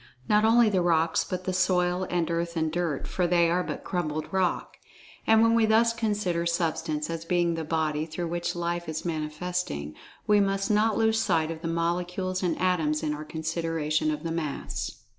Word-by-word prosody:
Not 210 Hz, 0 st, +4 dB
only 230 Hz, +1 st, +5 dB
the 195 Hz, -4 st, +2 dB
rocks, 165 Hz, -1 st, +2 dB
but 185 Hz, 0 st, -4 dB
the 185 Hz, -, -2 dB
soil 180 Hz, 0 st, +1 dB
and 175 Hz, -1 st, 0 dB
earth 170 Hz, 0 st, -2 dB
and 160 Hz, -1 st, 0 dB
dirt, 165 Hz, -4 st, -2 dB
for 180 Hz, -2 st, 0 dB
they 170 Hz, -1 st, +3 dB
are 180 Hz, +1 st, +2 dB
but -, -, -5 dB
crumbled 155 Hz, -4 st, -2 dB
rock. 190 Hz, -2 st, 0 dB, 0.5 s
And, 225 Hz, 0 st, +6 dB
when 230 Hz, 0 st, +4 dB
we 230 Hz, -1 st, +4 dB
thus 230 Hz, +1 st, +4 dB
consider 205 Hz, -7 st, -1 dB
Substance, 160 Hz, -2 st, -1 dB
as 165 Hz, -1 st, -4 dB
being 175 Hz, 0 st, +1 dB
the 165 Hz, -1 st, -3 dB
"body" 155 Hz, -1 st, -1 dB
through 170 Hz, +1 st, -4 dB
which 175 Hz, +1 st, -2 dB
Life 175 Hz, 0 st, -2 dB
is 160 Hz, +2 st, -4 dB
Manifesting, 155 Hz, -, -3 dB, 0.3 s
we 210 Hz, 0 st, +4 dB
must 195 Hz, 0 st, +1 dB
not 215 Hz, +1 st, +2 dB
lose 220 Hz, 0 st, +2 dB
sight 160 Hz, 0 st, +1 dB
of 160 Hz, -1 st, -7 dB
the 165 Hz, -, -3 dB
Molecules 180 Hz, +2 st, -1 dB
and 175 Hz, -3 st, -1 dB
Atoms, 160 Hz, -5 st, +1 dB
in 150 Hz, -1 st, 0 dB
our 150 Hz, +1 st, -6 dB
consideration 160 Hz, -1 st, -1 dB
of 150 Hz, 0 st, -3 dB
the 165 Hz, -, -3 dB
Mass. 160 Hz, -4 st, -4 dB
170 Hz, 190 wpm, -27 LUFS, 160-185 Hz, 0.5 s, And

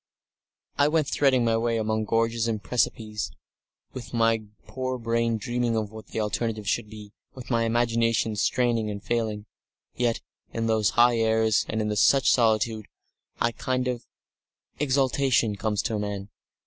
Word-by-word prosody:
I 145 Hz, -, +5 dB
went 155 Hz, -1 st, +1 dB
threading 130 Hz, -5 st, +2 dB
my 115 Hz, -1 st, +2 dB
way 115 Hz, 0 st, 0 dB
among 110 Hz, 0 st, -1 dB
gorges 115 Hz, +1 st, +1 dB
and 110 Hz, -2 st, -1 dB
precipices, 110 Hz, -2 st, -1 dB, 0.6 s
with 125 Hz, -1 st, -7 dB
my 115 Hz, -1 st, +3 dB, 0.2 s
poor 130 Hz, -1 st, -3 dB
brain 115 Hz, -1 st, 0 dB
dreaming 120 Hz, +1 st, -1 dB
of 105 Hz, -2 st, -2 dB
what 110 Hz, -1 st, -10 dB
the -, -, -4 dB
alternative 105 Hz, 0 st, -2 dB
should 105 Hz, +1 st, -1 dB
be, 105 Hz, -1 st, -11 dB, 0.2 s
with 130 Hz, 0 st, -9 dB
my 115 Hz, -1 st, +2 dB
imagination 115 Hz, -1 st, +1 dB
straining 115 Hz, 0 st, +1 dB
and 100 Hz, 0 st, -6 dB
failing. 110 Hz, -3 st, -2 dB, 0.5 s
Yet, 120 Hz, -2 st, 0 dB, 0.3 s
in 115 Hz, 0 st, -1 dB
those 110 Hz, -2 st, +2 dB
high 120 Hz, 0 st, +5 dB
airs 110 Hz, -1 st, +2 dB
and 110 Hz, 0 st, -1 dB
in 105 Hz, 0 st, -1 dB
such 135 Hz, +5 st, +4 dB
solitude, 110 Hz, -2 st, +2 dB, 0.5 s
a 115 Hz, -, +2 dB
kind 130 Hz, +1 st, -2 dB
of 125 Hz, -2 st, -3 dB, 0.7 s
exaltation 135 Hz, -5 st, +2 dB
comes 105 Hz, 0 st, -1 dB
to 110 Hz, -3 st, -1 dB
men.... 100 Hz, -1 st, -4 dB
115 Hz, 150 wpm, -26 LUFS, 110-120 Hz, 0.7 s, I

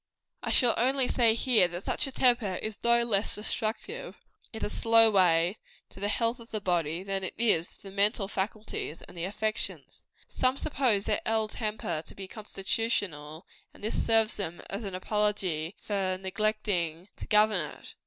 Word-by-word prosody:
I -, -, -4 dB
shall 245 Hz, -3 st, +4 dB
only 260 Hz, +2 st, +2 dB
say 230 Hz, -3 st, +3 dB
here, 230 Hz, -6 st, +4 dB
that 175 Hz, +2 st, -7 dB
such -, -, +2 dB
a -, -, -6 dB
temper 240 Hz, -7 st, +2 dB
is 215 Hz, +2 st, -5 dB
no 235 Hz, 0 st, +4 dB
less 215 Hz, -3 st, +1 dB
destructive 220 Hz, -, -3 dB, 0.4 s
in 220 Hz, -, -4 dB
a -, -, 0 dB
slow 225 Hz, +1 st, +5 dB
way 180 Hz, 0 st, +3 dB, 0.3 s
to -, -, -12 dB
the 200 Hz, -, -1 dB
health 230 Hz, +3 st, +1 dB
of 230 Hz, 0 st, -12 dB
the 215 Hz, -, -2 dB
body, 175 Hz, -3 st, -1 dB
than 195 Hz, 0 st, -2 dB
it 185 Hz, -, -4 dB
is 210 Hz, -8 st, +2 dB
to -, -, -23 dB
the 195 Hz, -, -9 dB
mental 200 Hz, 0 st, +2 dB
faculties 200 Hz, -4 st, -4 dB
and -, -, -14 dB
the 170 Hz, 0 st, -3 dB
affections. 215 Hz, +2 st, -3 dB, 0.2 s
Some 255 Hz, +1 st, +1 dB
suppose 255 Hz, -9 st, +1 dB
their 210 Hz, -, 0 dB
ill 220 Hz, -1 st, +1 dB
temper 210 Hz, -8 st, -3 dB
to -, -, -11 dB
be 195 Hz, -1 st, -7 dB
constitutional, 190 Hz, -7 st, -2 dB, 0.3 s
and -, -, -16 dB
this 215 Hz, -, -1 dB
serves 225 Hz, -1 st, +3 dB
them 175 Hz, -4 st, -4 dB
as 200 Hz, +4 st, -3 dB
an 195 Hz, -2 st, -4 dB
apology 190 Hz, -4 st, -1 dB
for 190 Hz, -3 st, -1 dB
neglecting 190 Hz, -3 st, -1 dB
to -, -, -7 dB
govern 210 Hz, -3 st, +4 dB, 0.2 s
it. -, -, -10 dB
210 Hz, 175 wpm, -29 LUFS, 185-225 Hz, 0.4 s, slow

